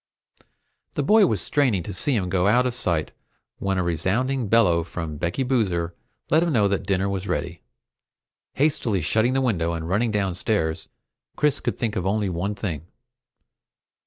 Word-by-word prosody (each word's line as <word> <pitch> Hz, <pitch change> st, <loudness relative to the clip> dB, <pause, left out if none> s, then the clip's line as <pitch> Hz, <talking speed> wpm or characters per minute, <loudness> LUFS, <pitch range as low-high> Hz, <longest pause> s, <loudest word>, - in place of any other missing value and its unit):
The 145 Hz, -, -1 dB
boy 210 Hz, +5 st, +5 dB
was 105 Hz, -, -1 dB
straining 125 Hz, -, +1 dB
to 100 Hz, -, -6 dB
see 135 Hz, +8 st, +1 dB
him 95 Hz, -5 st, 0 dB
out 105 Hz, +7 st, +3 dB
of 125 Hz, -, 0 dB
sight 85 Hz, -9 st, -1 dB, 0.5 s
when 95 Hz, -1 st, -1 dB
a 90 Hz, -, +1 dB
resounding 110 Hz, -, 0 dB
bellow 95 Hz, -7 st, +4 dB
from 80 Hz, -2 st, -6 dB
Becky 85 Hz, -, -1 dB
Boozer 95 Hz, -10 st, 0 dB, 0.4 s
let 160 Hz, +3 st, +5 dB
him 170 Hz, -1 st, +1 dB
know 105 Hz, -7 st, +3 dB
that 100 Hz, -1 st, -2 dB
dinner 95 Hz, -1 st, +1 dB
was 100 Hz, 0 st, -3 dB
ready. 85 Hz, -3 st, -3 dB, 0.9 s
Hastily 125 Hz, -, +1 dB
shutting 110 Hz, +8 st, +2 dB
the 135 Hz, -, +1 dB
window 85 Hz, -10 st, 0 dB
and 80 Hz, -1 st, -4 dB
running 105 Hz, +6 st, +1 dB
downstairs, 95 Hz, -4 st, -1 dB, 0.5 s
Chris 150 Hz, -1 st, +1 dB
could -, -, -3 dB
think 115 Hz, -4 st, -2 dB
of 95 Hz, 0 st, -1 dB
only 105 Hz, 0 st, 0 dB
one 90 Hz, +4 st, -2 dB
thing. 85 Hz, -7 st, -4 dB
100 Hz, 160 wpm, -24 LUFS, 85-120 Hz, 0.9 s, boy